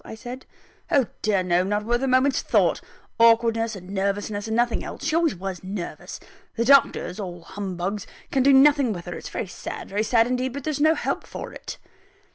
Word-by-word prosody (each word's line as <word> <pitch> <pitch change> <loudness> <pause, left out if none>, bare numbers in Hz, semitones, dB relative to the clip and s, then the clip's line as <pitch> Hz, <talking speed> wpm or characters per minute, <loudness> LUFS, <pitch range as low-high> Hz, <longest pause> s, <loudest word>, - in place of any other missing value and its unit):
I - - -9
said. 245 +3 -9 0.4
"Oh 275 -3 +3 0.2
dear 200 -3 +1
no! 175 0 +2
not 205 +2 -1
worth 240 +2 0
a 270 - 0
moment's 260 +1 +3
thought - - +2 0.4
awkwardness 230 -1 +4
and 185 0 -10
nervousness, 205 +2 -2
nothing 235 +2 0
else - - -8
she 315 +1 +1
always 330 - +2
was 190 0 -6
nervous 185 -1 -6 0.4
the 230 - 0
doctors 250 -8 +4
(all 175 -4 -6
humbugs) 195 +2 -4 0.2
can 270 - +2
do 275 +2 +5
nothing 275 -3 +5
with 175 -2 -8
her 175 - -5
it's - - -7
very - - -3
sad, 185 - -7
very 205 +2 -1
sad 225 +1 +3
indeed; 250 +1 -1
but 280 0 -6
there's 300 -1 -2
no 315 +2 +5
help - - -2
for - - -7
it." - - -8
225 Hz, 195 wpm, -24 LUFS, 195-260 Hz, 0.4 s, do